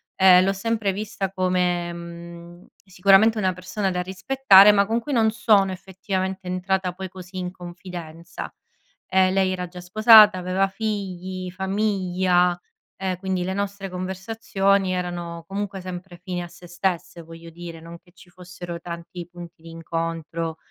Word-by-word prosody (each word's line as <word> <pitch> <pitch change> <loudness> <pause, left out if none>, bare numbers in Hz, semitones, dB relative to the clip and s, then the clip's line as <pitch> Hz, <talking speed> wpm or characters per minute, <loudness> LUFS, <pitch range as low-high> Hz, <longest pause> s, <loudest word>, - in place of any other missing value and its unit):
ehm, 185 -1 +7
l’ho 195 +1 +1
sempre 215 0 -1
vista 195 -1 -4
come, 180 -2 0
mhmm, 170 0 -10 0.2
sicuramente 195 +4 +4
una 185 -3 +1
persona 190 +2 -3
da 180 0 -1
rispettare 195 +2 +6
ma 200 0 +4
con 225 +3 0
cui 280 +4 -5
non 220 -2 +3
sono 205 -4 +3
effettivamente 190 0 -4
entrata 185 0 -1
poi 190 +1 -6
così 185 0 -10
in 180 -1 -3
confidenza. 175 -2 -9 0.5
Ehm, 185 0 +3
lei 190 -1 +2
era 180 -1 -3
già 180 0 -10
sposata, 215 +1 +7
aveva 185 +2 0
figli, 190 -3 -4
famiglia, 185 -2 +1 0.4
ehm, 185 -2 -2
quindi 185 -1 -2
le 190 +1 -2
nostre 200 -1 -4
conversazioni 195 +1 -1
erano 175 -2 -4
comunque 195 -1 -4
sempre 180 -1 -8
fini 180 0 -5
a - - -7
sé 175 +1 -15
stesse 175 -1 -3
voglio 165 +1 -12
dire, 165 -1 -9
non 170 +1 -11
che 175 - -25
ci 180 -1 -18
fossero 175 -1 -9
tanti 170 0 -8
punti 175 -1 -12
d’incontro 165 0 -4
185 Hz, 150 wpm, -23 LUFS, 175-195 Hz, 0.5 s, ehm